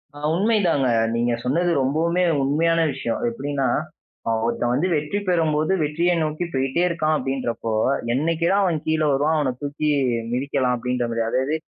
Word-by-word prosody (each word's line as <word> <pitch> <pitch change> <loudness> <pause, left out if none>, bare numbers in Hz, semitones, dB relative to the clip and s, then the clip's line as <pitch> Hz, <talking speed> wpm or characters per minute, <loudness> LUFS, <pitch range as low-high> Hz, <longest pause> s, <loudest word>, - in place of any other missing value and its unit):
ஆ, - - -10 0.2
உண்மைதாங்க. 185 - +2 0.3
நீங்க 120 0 +1
சொன்னது 170 +7 +1
ரொம்பவுமே 165 +6 +1 0.2
உண்மையான 165 +4 +2
விஷயம். 130 -4 -3
அது 240 - -1
எப்பிடின்னா, 145 - -2 0.6
அ, - - -1 0.2
ஒருத்தன் 120 +1 0
வந்து 160 +8 +1
வெற்றி 150 +7 -1
பெறும்போது 160 0 +1
வெற்றிய 170 +4 +1
நோக்கி 155 +3 -2
போயிட்டே 135 +5 0
இருக்கான் 155 -2 0
அப்பிடின்றப்போ! 120 -4 -3 0.4
என்னைக்கிடா 165 +6 +1
அவன் 170 -5 +1
கீழ 160 0 +1
வருவான். 145 +4 +2
அவன 130 -4 0
தூக்கி 150 +1 -2 0.4
மிதிக்கலாம், 130 0 0
அப்பிடின்றமாரி. 120 -1 -1
அதாவது 135 +6 0
150 Hz, 145 wpm, -22 LUFS, 130-165 Hz, 0.6 s, உண்மைதாங்க